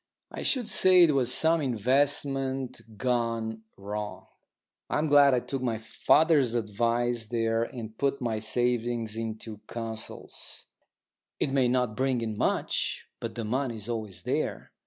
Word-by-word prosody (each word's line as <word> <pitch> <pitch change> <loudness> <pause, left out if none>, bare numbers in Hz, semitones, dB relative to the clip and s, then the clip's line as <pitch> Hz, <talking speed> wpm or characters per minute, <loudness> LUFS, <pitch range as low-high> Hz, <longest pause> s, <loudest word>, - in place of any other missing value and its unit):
I - - -6
should 250 -5 +1
say 185 -4 +6
it 165 - +5
was 130 -3 +3
some 160 +4 +4
investment 135 -1 0
gone 115 -2 -1 0.2
wrong. 105 +1 -5 0.6
I'm 155 +1 0
glad 140 -2 +6
I - - +2
took 135 +1 -4
my 120 -3 -1
father's 140 +3 +3
advice 115 +1 0
there 115 0 0
and 115 -3 -8
put 140 +3 0
my 115 -3 -2
savings 120 0 0
into 110 -1 -5
Consols. 115 -1 -7 0.7
It 135 - 0
may 135 -2 +3
not 125 -3 0
bring 130 -1 0
in 110 -2 -3
much, - - -1
but 115 -1 -5
the 115 -2 -4
money 125 +2 -1
is 105 -1 -7
always 110 -5 -5
there. - - -2
120 Hz, 140 wpm, -28 LUFS, 110-135 Hz, 0.7 s, say